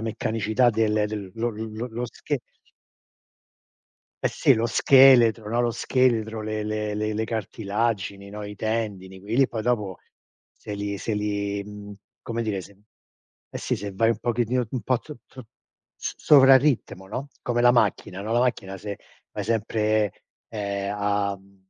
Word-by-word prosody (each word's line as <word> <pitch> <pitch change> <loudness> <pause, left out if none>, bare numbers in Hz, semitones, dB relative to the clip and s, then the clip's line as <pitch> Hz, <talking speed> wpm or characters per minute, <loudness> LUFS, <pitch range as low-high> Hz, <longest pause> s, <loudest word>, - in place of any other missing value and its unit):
meccanicità 110 +1 +1
del 105 -1 +1
del 105 -3 -6
lo 115 +1 -1
lo 110 +1 -5
lo 120 +1 -4
sche 140 +3 -4 1.8
Eh - - +3
sì, - - +3
lo 115 +1 +1
scheletro, 120 -4 +6
no, 120 +2 +1
lo 120 - +1
scheletro, 115 -3 +1
le 110 0 -3
le 105 0 -2
le 110 +1 -2
le 110 +1 -1
cartilagini, 105 -2 -2
no, 105 +1 -7
i 105 0 -7
tendini, 105 -4 -3
quei 105 +4 -5
li 135 0 +4
poi 110 -2 -4
dopo 105 -6 -1 0.6
se 105 - -8
li 100 0 -3
se 110 - -2
li, 100 -1 -2
mhmm, 105 0 -9 0.3
come 115 0 -3
dire, 105 -4 -2
se 100 +2 -14 0.7
Eh - - -6
sì, - - -1
se 100 0 -6
vai 115 +3 +3
un 115 - -1
pochettino 120 +1 0
un 130 -4 -2
po' 125 +3 +1
tro 150 +4 -11
tro 130 -4 -12 0.5
s - - -4
sovra-ritmo, 135 -8 +5
no, 130 +8 -5
come 120 0 0
la 120 - +7
macchina, 100 -5 +1
no, 110 +3 -3
la 120 - +3
macchina 105 -6 -1
se 100 +1 -6 0.3
vai 105 - -4
sempre, 110 -1 +1 0.4
ehm, 100 -2 -3
a, 100 -1 0
mhmm 100 +1 -23
110 Hz, 165 wpm, -25 LUFS, 100-120 Hz, 1.8 s, la